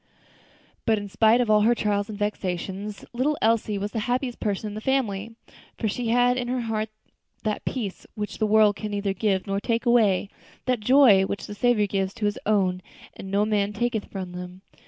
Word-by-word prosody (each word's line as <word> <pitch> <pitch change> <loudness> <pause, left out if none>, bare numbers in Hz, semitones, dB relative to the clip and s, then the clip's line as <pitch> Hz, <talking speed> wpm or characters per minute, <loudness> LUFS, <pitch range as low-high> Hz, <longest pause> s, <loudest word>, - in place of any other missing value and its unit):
But 220 -1 +4
in 205 0 -5
spite 220 +4 +4
of 230 -3 +1
all 210 0 +5
her 235 +3 +4
trials 205 -1 0
and 210 - -6
vexations, 200 0 -3
little 280 +5 0
Elsie 220 -2 +1
was 205 +1 -3
the 225 - -2
happiest 250 0 -1
person 205 0 -2
in 205 - -6
the 215 - -6
family; 225 -4 -1 0.4
for 220 - -1
she 235 +3 -2
had 245 +2 +3
in 245 -1 -2
her 250 0 -1
heart 220 -1 -2 0.5
that 215 -1 -2
peace 215 -8 -4
which 210 -1 -5
the 215 - +2
world 210 -1 +5
can 215 - -4
neither 200 -1 -1
give 195 -1 0
nor 195 0 -1
take 230 +2 -1
away; 220 -6 +3 0.4
that 250 -2 +1
joy 245 -3 +6
which 200 - -4
the - - -7
Saviour 225 0 +2
gives 195 -1 -2
to 215 - -2
His 205 0 -1
own, 190 -4 +2 0.3
and 190 - -9
no 200 +2 +2
man 210 -1 0
taketh 225 0 -1
from 185 -2 -6
them. 180 +1 -8
210 Hz, 200 wpm, -25 LUFS, 200-230 Hz, 0.5 s, joy